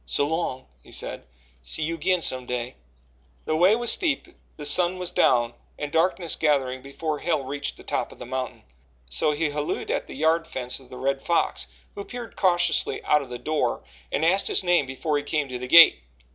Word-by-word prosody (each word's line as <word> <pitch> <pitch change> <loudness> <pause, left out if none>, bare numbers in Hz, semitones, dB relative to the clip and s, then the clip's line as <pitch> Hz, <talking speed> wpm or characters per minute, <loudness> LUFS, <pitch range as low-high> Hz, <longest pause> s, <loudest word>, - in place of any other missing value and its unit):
"So 100 - +2
long," 145 -4 -2 0.2
he - - -18
said. 65 - -4 0.3
"See - - -2
you 165 +2 -1
agin 175 +2 +1
some 130 -1 -2
day." 125 0 -3 0.7
The 155 - 0
way 180 +6 +5
was 240 0 +3
steep 315 -8 +1
and - - -20 0.2
the 150 - -7
sun 175 +4 +3
was 180 -1 -3
down 120 -1 +3 0.2
and 150 -1 -5
darkness 170 0 +1
gathering 135 -4 +1
before 150 +3 -4
Hale 160 -5 0
reached 145 +2 -3
the - - -13
top - - -2
of - - -14
the - - -8
mountain 130 0 -5 0.4
so 70 - +1
he 150 +1 0
hallooed 150 0 -3
at - - -2
the - - -9
yard 160 +3 +1
fence 125 -5 -3
of 130 - -17
the 125 - -9
Red 135 +1 -1
Fox, 170 +3 0 0.3
who 200 - -6
peered 245 +1 -8
cautiously 175 -2 +1
out 150 - +3
of 135 - -9
the 125 - -5
door 150 - -1 0.3
and 155 - 0
asked 190 +4 +3
his - - +1
name 175 -6 +2
before 145 +3 -1
he - - -7
came 150 -1 -1
to 125 -1 -5
the 125 - -5
gate. 165 - +9
150 Hz, 210 wpm, -25 LUFS, 130-170 Hz, 0.7 s, gate